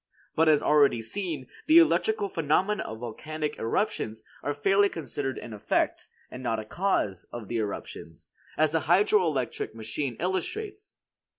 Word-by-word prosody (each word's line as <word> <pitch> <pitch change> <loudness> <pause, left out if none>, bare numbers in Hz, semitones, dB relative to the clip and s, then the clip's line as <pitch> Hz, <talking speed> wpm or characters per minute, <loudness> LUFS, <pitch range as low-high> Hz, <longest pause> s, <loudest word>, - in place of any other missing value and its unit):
But 160 0 +4
as 150 -2 +4
already 145 -5 +4
seen, 155 - -3 0.2
the 315 +1 +7
electrical 220 -10 +4
phenomena 185 +5 +1
of 110 - -6
volcanic 150 +6 -4
eruptions 115 - -1 0.2
are 145 - -2
fairly 195 +7 +3
considered 145 -5 -4
an 115 - -7
effect, 105 - 0 0.2
and 125 - -7
not 115 -3 0
a 110 - -6
cause, 110 - -1
of 120 -4 -7
the 120 - -1
eruptions, 100 -6 -6 0.3
as 155 -1 +3
the 160 - +2
hydro 190 +5 +4
electric 130 -7 -2
machine 115 +4 -3
illustrates. 400 - -3
150 Hz, 150 wpm, -27 LUFS, 120-195 Hz, 0.3 s, the